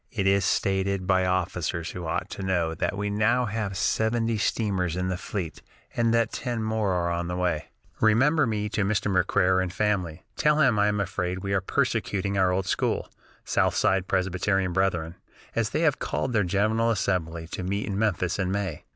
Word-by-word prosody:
It 100 -5 -2
is 100 0 +3
stated 95 +1 0
by 95 -1 +2
officers 90 -2 -1
who 90 -2 -6
ought - - -2
to - - -6
know 90 -4 0
that 85 +4 -2
we 105 0 -2
now 110 +4 +2
have 105 -3 -3
seventy 115 +2 +1
steamers 95 -6 0
in 90 0 -1
the 95 - -1
fleet, 90 -4 -5 0.3
and 115 -1 +2
that 115 0 +2
ten 120 -3 -3
more 110 -3 0
are 85 -1 0
on 85 0 -2
the 90 - -3
way.... 90 -4 0 0.3
"Remember 130 +7 +4
me 105 -2 -1
to 105 -1 0
Mr. 100 0 0
McCarer 95 0 +3
and 95 -1 -2
family. 90 -5 -1
Tell 150 0 +3
him 130 -8 +4
I 105 - +4
am 105 0 0
afraid 95 -1 -2
we 100 0 -1
are 100 - +2
persecuting 100 +1 -1
our 95 -1 +3
old 95 +1 0
school, - - -1 0.3
southside 95 -1 +2
Presbyterian 95 0 0
brethren, 85 -3 0 0.4
as 115 -2 +1
they 155 - -1
have 150 -5 +2
called 125 - -2
their 105 -2 +3
General 110 +5 +1
Assembly 85 -6 -1
to - - -5
meet 100 +3 -2
in 100 - -3
Memphis 95 -4 0
in 95 -1 0
May. 95 -6 -3
95 Hz, 190 wpm, -26 LUFS, 90-110 Hz, 0.4 s, Remember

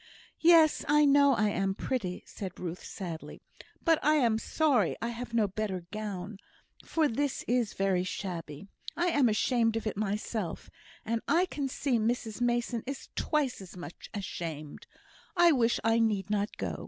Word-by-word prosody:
"Yes! 330 -2 +6
I 300 +1 +5
know 280 -1 +5
I 210 -1 +2
am 195 -1 0
pretty," 200 -7 -3
said 190 -4 -7
Ruth, 180 0 -5
sadly, 170 -5 -7 0.4
"but 325 -5 +3
I 305 +2 +4
am 235 -6 +3
sorry 260 - +2
I 230 - -2
have 240 +1 -6
no 220 -3 +3
better 190 -3 -3
gown, 205 -2 -5 0.4
for 320 -2 +1
this 285 +2 -1
is 240 -3 +1
very 195 -2 +1
shabby. 175 -4 -5 0.3
I 350 +1 +2
am 285 -7 +3
ashamed 225 +1 +2
of 225 - -2
it 215 - -2
myself, 210 -2 -3 0.3
and 230 0 -1
I 350 +2 +4
can 285 -6 -3
see 255 -2 0
Mrs 225 0 -1
Mason 240 -1 0
is 275 0 -6
twice 290 -8 0
as 185 -1 -11
much 175 -1 -9
ashamed. 165 -7 -6 0.5
I 345 -1 +7
wish 235 -5 +2
I 225 +1 +3
need 210 -3 +1
not 205 0 -1
go. - - -3
225 Hz, 165 wpm, -30 LUFS, 195-270 Hz, 0.5 s, I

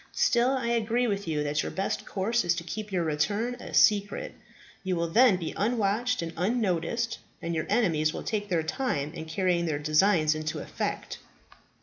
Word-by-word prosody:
Still, 240 +1 +3
I 235 -2 -2
agree 235 +1 +1
with 200 -4 -2
you 150 -2 0
that 150 +1 0
your - - -4
best 195 +2 -3
course 220 +4 0
is 175 -1 +2
to 170 - -4
keep 210 +5 -6
your 180 -3 0
return 205 +10 0
a - - -9
secret. 210 - +3 0.5
You 190 -1 -1
will 170 -1 -1
then 225 +1 +5
be 165 -3 -4
unwatched 225 +1 0
and 165 0 -5
unnoticed, 220 +3 -1 0.2
and 170 - -3
your 160 -1 -2
enemies 160 -9 +2
will - - -6
take 205 -2 -2
their 170 -3 +1
time 155 - -2
in 160 -2 -6
carrying 170 +1 0
their 155 -2 0
designs 155 +2 +3
into 155 0 -3
effect." - - -4
190 Hz, 185 wpm, -28 LUFS, 160-225 Hz, 0.5 s, then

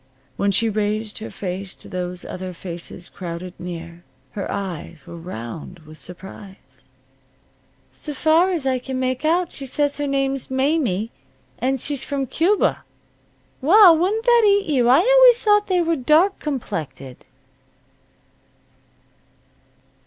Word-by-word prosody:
When 200 - 0
she 205 +4 +2
raised 215 0 -1
her 220 - -7
face 190 0 -6
to - - -12
those 180 -1 -5
other 185 0 -6
faces 175 0 -7
crowded 175 0 -7
near, 170 -1 -8 0.3
her 200 - -5
eyes 175 -5 -6
were - - -10
round 165 0 -8
with 155 0 -12
surprise. 190 +4 -11 1.0
"'S - - -10
far's 325 0 +2
I 260 -1 +1
can 260 +1 -5
make 255 +1 -1
out, 335 +3 +1
she 275 - -7
says 290 +2 -1
her 290 - -1
name's 275 -1 -1
Mamie, 260 - 0 0.5
and 265 +1 0
she's 280 +1 -2
from 280 -2 -2
Cuba. 350 - +1 0.8
Well, 355 +4 +8
wouldn't 390 +7 0
that 475 -1 +6
eat 405 -1 +4
you! 255 -6 +2
I 265 +6 +6
always - - +6
thought 415 -1 +4
they 365 -2 +2
was 330 -3 0
dark 320 +9 +3
complected." 155 - -5
255 Hz, 130 wpm, -21 LUFS, -, 1.0 s, Well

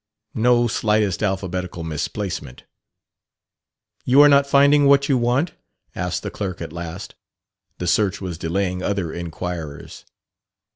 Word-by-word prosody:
No 120 -1 +3
slightest 105 -4 0
alphabetical 95 -4 -3
misplacement. 80 -2 -5 1.4
"You 130 +3 +4
are - - +8
not 140 0 +5
finding 140 +1 +5
what 140 0 +4
you 140 - +2
want?" 125 +7 +1 0.4
asked 90 -1 -3
the - - -4
clerk 95 -3 -5
at 80 -2 -7
last. 85 +4 -7 0.6
The 90 - -4
search 95 +2 +1
was 90 -4 -6
delaying 90 +2 -2
other 95 -4 -2
inquirers. 85 -3 -6
95 Hz, 125 wpm, -21 LUFS, 85-120 Hz, 1.4 s, are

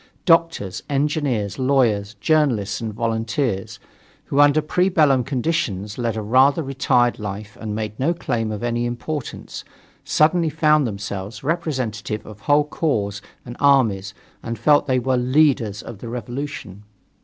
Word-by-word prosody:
Doctors, 165 - +2
engineers, 140 -7 -1
lawyers, 115 -6 +1
journalists 115 -4 +1
and 110 -1 -3
volunteers, 115 -1 -2 0.5
who 140 - -1
under 145 +1 +6
pre 180 +5 +1
bellum 145 -7 +3
conditions 125 - -2
led 115 -2 -1
a 110 - -3
rather 135 +8 +4
retired 125 -3 +1
life 105 0 -6
and 110 -2 -4
made 110 -1 -4
no 140 +6 +2
claim 120 -10 -2
to 110 +2 -4
any 120 0 -1
importance, 125 +4 -5 0.4
suddenly 160 +2 +2
found 150 -2 +3
themselves 100 +1 -6
representative 130 -10 -2
of 105 -1 -11
whole 145 +5 +3
corps 105 -11 -1 0.2
and 120 -1 -8
armies 115 -9 +2 0.3
and 115 0 -5
felt 150 -1 +3
that 130 - +1
they - - +3
were 130 +1 0
"leaders" 125 -5 +2
of 105 - -9
the 115 - -7
revolution. 120 -4 -6
120 Hz, 145 wpm, -21 LUFS, 105-145 Hz, 0.5 s, under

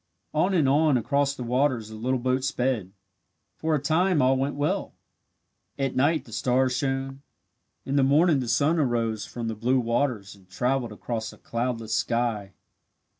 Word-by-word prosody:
On 180 +5 +2
and 155 -6 +3
on 145 0 +4
across 140 +3 0
the 125 - -6
waters 125 -2 0
the 110 - -9
little 125 +4 -1
boat 130 +1 0
sped. 125 -7 -1 0.6
For 160 0 0
a - - +1
time 160 +4 +2
all 130 0 +4
went 135 +2 -1
well. 145 +1 -1 0.8
At 135 -2 -1
night 150 +5 +2
the 115 - -14
stars 125 +3 +1
shone. 135 0 -2 0.6
In 135 +1 -1
the 140 - +4
morning 150 +3 +4
the 125 - -3
sun 145 +8 +2
arose 115 -6 0
from 120 -2 -5
the 115 - -2
blue 125 +5 +1
waters 115 -3 -1
and 95 -2 -21
travelled 125 +4 -1
across 110 +1 -4
a - - -16
cloudless 115 -2 -3
sky. 115 -5 -1
130 Hz, 170 wpm, -26 LUFS, 115-140 Hz, 0.8 s, on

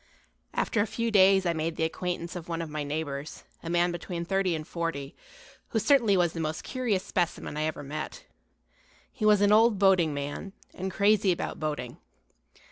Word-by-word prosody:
After - - +1
a 210 - 0
few 230 +2 -2
days 195 -2 +5
I 170 - +2
made 160 0 -2
the - - -1
acquaintance 175 +1 -3
of 175 -1 -7
one 165 -1 -2
of 165 -2 -5
my 150 -1 -3
neighbors, 145 -1 -4 0.2
a 165 - -6
man 175 +1 +2
between 175 0 -5
thirty 190 -1 +1
and 155 -1 -6
forty, 165 -5 -4 0.5
who - - -2
certainly 225 -3 +4
was 175 -2 +2
the 165 - -5
most 155 0 -3
curious 235 -8 -1
specimen 175 -4 -2
I 155 +1 -1
ever 155 -2 -3
met. 150 +2 -6 0.9
He 230 -5 -3
was 210 -1 +5
an 205 0 +4
old 220 0 +5
boating 185 -5 +4
man, 145 +7 -5 0.2
and 190 +1 -4
crazy 200 0 +3
about 175 - -3
boating. 150 -6 -4
175 Hz, 185 wpm, -28 LUFS, 155-195 Hz, 0.9 s, days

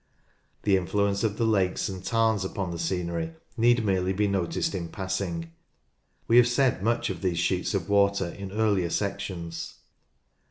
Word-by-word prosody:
The 100 -2 +4
influence 100 +2 0
of 105 -2 0
the 115 - +1
lakes 95 -5 +1
and 95 -2 -6
tarns 110 -2 +2
upon 95 -1 -3
the 85 - -5
scenery 85 -1 -2 0.2
need 120 0 +3
merely 95 -1 +1
be 105 +2 +1
noticed 95 -2 -1
in 85 -4 -4
passing. 95 -3 -3 0.8
We 115 - +5
have 125 0 +7
said 120 -4 +2
much 115 0 +1
of 90 -3 -7
these 90 -3 0
sheets 90 +4 0
of 85 -4 -2
water 100 -2 +2
in 100 +2 -7
earlier 100 -4 +1
sections. 95 -4 -4
95 Hz, 160 wpm, -27 LUFS, 90-105 Hz, 0.8 s, have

